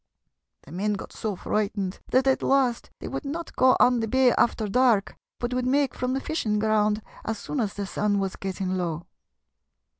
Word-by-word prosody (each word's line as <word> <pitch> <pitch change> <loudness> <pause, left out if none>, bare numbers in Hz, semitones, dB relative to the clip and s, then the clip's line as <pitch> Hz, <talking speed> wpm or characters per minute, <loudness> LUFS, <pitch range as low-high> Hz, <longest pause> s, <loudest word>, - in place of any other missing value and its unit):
The - - -15
men 205 +5 -1
got 200 - -7
so 215 -3 -3
frightened 200 -1 -2
that 260 +1 +3
at 265 -1 +2
last 260 -4 +1
they - - -7
would - - -4
not 320 +4 -5
go 255 0 +5
on 245 -1 +5
the 225 - -1
bay 260 +1 +4
after 225 -2 +1
dark, 235 -2 +2 0.2
but 240 +1 -3
would 250 0 0
make 275 0 +2
from 250 0 -2
the - - 0
fishing 255 -8 -1
ground 215 0 +1 0.2
as 220 0 -3
soon 285 - -4
as 210 -4 -1
the 205 - -3
sun 205 +1 0
was 195 -1 -2
getting 190 -1 -3
low. 170 -2 -3
220 Hz, 190 wpm, -26 LUFS, 200-255 Hz, 0.2 s, go